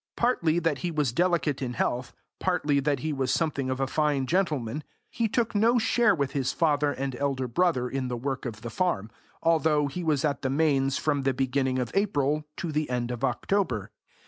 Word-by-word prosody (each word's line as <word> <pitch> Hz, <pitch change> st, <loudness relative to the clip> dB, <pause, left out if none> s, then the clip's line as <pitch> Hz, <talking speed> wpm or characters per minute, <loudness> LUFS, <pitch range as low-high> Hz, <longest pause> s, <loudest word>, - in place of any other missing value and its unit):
Partly 175 Hz, -10 st, +2 dB
that 165 Hz, -1 st, 0 dB
he 175 Hz, -, -2 dB
was 150 Hz, -6 st, 0 dB
delicate 170 Hz, -4 st, +1 dB
in 125 Hz, -2 st, -2 dB
health, 125 Hz, +1 st, -1 dB, 0.3 s
partly 150 Hz, -6 st, +1 dB
that 140 Hz, -2 st, 0 dB
he 155 Hz, +1 st, -1 dB
was 135 Hz, -2 st, -1 dB
something 140 Hz, -4 st, 0 dB
of 130 Hz, 0 st, -2 dB
a 135 Hz, -, +2 dB
fine 145 Hz, -1 st, +1 dB
gentleman, 150 Hz, -6 st, 0 dB, 0.3 s
he 230 Hz, -1 st, 0 dB
took 230 Hz, +2 st, 0 dB
no 225 Hz, +4 st, +4 dB
share 235 Hz, +1 st, +3 dB
with 140 Hz, -4 st, -1 dB
his 135 Hz, -3 st, 0 dB
father 150 Hz, -3 st, +2 dB
and 135 Hz, -1 st, -3 dB
elder 135 Hz, -2 st, -1 dB
brother 125 Hz, -1 st, +1 dB
in 130 Hz, 0 st, -2 dB
the 125 Hz, -1 st, -3 dB
work 135 Hz, +1 st, -3 dB
of 110 Hz, -2 st, -7 dB
the 115 Hz, 0 st, -6 dB
farm, 115 Hz, -, -1 dB, 0.3 s
although 160 Hz, -2 st, +3 dB
he 160 Hz, +6 st, -4 dB
was 155 Hz, -3 st, +1 dB
at 145 Hz, -2 st, -1 dB
the 130 Hz, -, -1 dB
Mains 135 Hz, -2 st, +2 dB
from 145 Hz, -2 st, 0 dB
the 135 Hz, -1 st, 0 dB
beginning 130 Hz, 0 st, 0 dB
of 125 Hz, -2 st, -2 dB
April 150 Hz, -7 st, +1 dB
to 170 Hz, -, -3 dB
the 150 Hz, -1 st, -1 dB
end 125 Hz, -1 st, -1 dB
of 120 Hz, +1 st, -5 dB
October. 135 Hz, -, 0 dB
145 Hz, 200 wpm, -27 LUFS, 130-165 Hz, 0.3 s, no